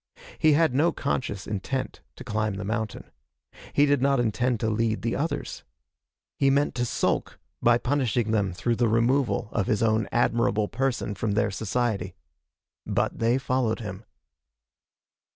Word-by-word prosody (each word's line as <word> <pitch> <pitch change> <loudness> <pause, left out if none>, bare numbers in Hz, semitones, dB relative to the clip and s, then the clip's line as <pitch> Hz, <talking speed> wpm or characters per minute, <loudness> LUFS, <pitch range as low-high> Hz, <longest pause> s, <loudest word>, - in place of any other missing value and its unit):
He 155 -1 +5
had 160 -2 +3
no 155 +6 +3
conscious 105 -8 -3
intent 120 +6 -3
to - - -10
climb 110 -3 -1
the 100 - -5
mountain. 110 0 -4 0.6
He 145 - +4
did 145 -2 +2
not 140 -1 +3
intend 120 +1 0
to 110 - +1
lead 110 -2 0
the 115 - 0
others. 160 +4 -3 0.8
He 135 - +4
meant 140 +2 +2
to 120 0 -1
sulk, - - -1 0.2
by 120 0 +5
punishing 125 -4 0
them 100 -4 +1
through 115 +6 -1
the 120 -2 +2
removal 115 0 +1
of 100 -4 -1
his 105 - +1
own 110 -1 +1
admirable 115 -3 +2
person 125 -3 -1
from 100 +1 -2
their 105 - +1
society. 100 -2 -2 0.7
But - - -1
they 115 +2 +3
followed 130 -3 0
him. 100 -1 -7
115 Hz, 150 wpm, -26 LUFS, 105-130 Hz, 0.8 s, He